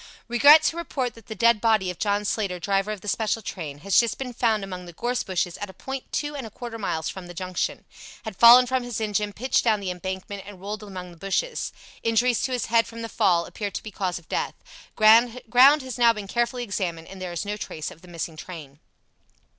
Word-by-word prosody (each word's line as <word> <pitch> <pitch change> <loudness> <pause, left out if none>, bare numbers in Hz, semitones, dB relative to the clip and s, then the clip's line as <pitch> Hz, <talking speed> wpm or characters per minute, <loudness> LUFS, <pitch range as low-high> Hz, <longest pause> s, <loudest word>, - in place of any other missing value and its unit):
"Regret 285 +6 +7
to 325 - +1
report 270 -8 -3
that 230 -2 -17
the 220 - -6
dead 230 +1 +4
body 215 -5 +2
of 180 - -12
John 205 -1 0
Slater, 200 -3 -1
driver 195 +3 0
of 210 -3 -6
the 210 - -11
special 220 +1 -1
train, 150 -7 -6
has 195 +2 +4
just 235 -2 +1
been 255 -2 -5
found 225 -3 +1
among 180 -2 -7
the 175 - -10
gorse 245 +7 -1
bushes 180 -2 -2
at 205 - -5
a 190 - -12
point 265 +5 -7
two 295 0 -2
and 265 -5 -5
a - - -10
quarter 230 +1 -8
miles 160 -7 -2
from 185 -2 -6
the 175 - -10
Junction. 185 0 -3 0.4
Had 220 -3 -5
fallen 235 +5 +9
from 260 +1 0
his 245 -2 -4
engine, 210 -1 -1
pitched 255 +5 0
down 220 -3 +2
the 190 -2 -3
embankment, 190 +2 -5
and 205 -3 -10
rolled 205 +2 -5
among 185 -3 -8
the 170 - -15
bushes. 195 - -2 0.3
Injuries 230 +1 +2
to 265 - -1
his 250 -3 -1
head, 230 0 +3
from 230 0 -8
the 230 - -5
fall, 180 -7 +2
appear 205 +3 -5
to - - -6
be 215 - -8
cause 185 -3 -2
of 170 - -13
death. - - -2 0.4
Ground 225 +2 +6 0.5
has 255 -1 -6
now 235 -1 +6
been 210 -2 -6
carefully 240 +3 -1
examined, 180 -6 -3
and 190 -1 -10
there 180 -1 -4
is 175 +3 -4
no 205 +1 -2
trace 155 -6 -6
of 165 - -15
the 180 - -16
missing 170 -1 -5
train." 155 -4 -10
210 Hz, 235 wpm, -25 LUFS, 185-235 Hz, 0.5 s, fallen